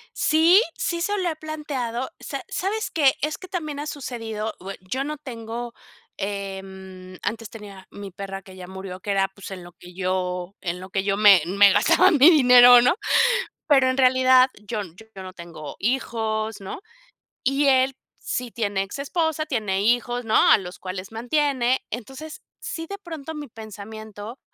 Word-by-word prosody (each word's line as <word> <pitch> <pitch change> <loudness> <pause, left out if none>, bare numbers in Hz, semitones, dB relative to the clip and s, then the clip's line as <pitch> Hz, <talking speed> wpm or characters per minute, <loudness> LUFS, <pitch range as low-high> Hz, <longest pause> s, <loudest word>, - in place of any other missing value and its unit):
Sí, 330 +6 +5 0.2
sí 340 -1 -1
se 410 +4 0
lo 365 -3 0
he 320 - -3
planteado, 280 -6 -4
¿sa - - -6
sabes 430 +4 -2
qué? 285 -5 +4
Es 305 +1 -1
que 370 - -11
también 310 -6 -4
ha 295 - -4
sucedido, 225 -6 -5
bue 195 +2 -7
yo 255 +9 -3
no 300 +1 -4
tengo, 235 -3 -7 0.4
em, 190 -2 -7
antes 225 -1 -3
tenía 200 -4 -11
mi 200 -1 -9
perra 195 +1 -7
que 190 0 -14
ya 180 -1 -9
murió, 190 0 -8
que 200 - -4
era, 195 -1 +1
pues, 195 0 -11
en 185 -2 -7
lo 175 - -12
que 180 0 -15
yo 180 0 -2
en 180 0 -4
lo 185 - -9
que 195 +1 -1
yo 195 -1 +1
me 200 -3 +7
me 200 +3 +5
gastaba 345 - +5
mi 300 0 +7
dinero, 245 -5 +8
¿no? 250 +7 +3 0.7
Pero 270 -3 +5
en 255 - 0
realidad 255 0 +5
yo 210 +1 -4
yo 195 +3 -12
no 185 0 -9
tengo 170 -5 -9
hijos, 220 -2 -2
¿no? 195 - -7 0.6
Y 275 +2 +2
él 265 0 +3 0.2
sí 250 -1 -3
tiene 205 -4 -1
exesposa, 310 - -2
tiene 215 -10 -1
hijos, 245 +2 +1
¿no? 220 - 0 0.2
A - - +8
los 180 -3 -9
cuales 185 +1 -6
mantiene. 255 +1 0
Entonces 265 +7 -7 0.2
sí, 325 0 -5
de 400 - -5
pronto 320 -5 -8
mi 295 -1 -6
pensamiento, 220 +1 -9
225 Hz, 170 wpm, -23 LUFS, 195-275 Hz, 0.7 s, dinero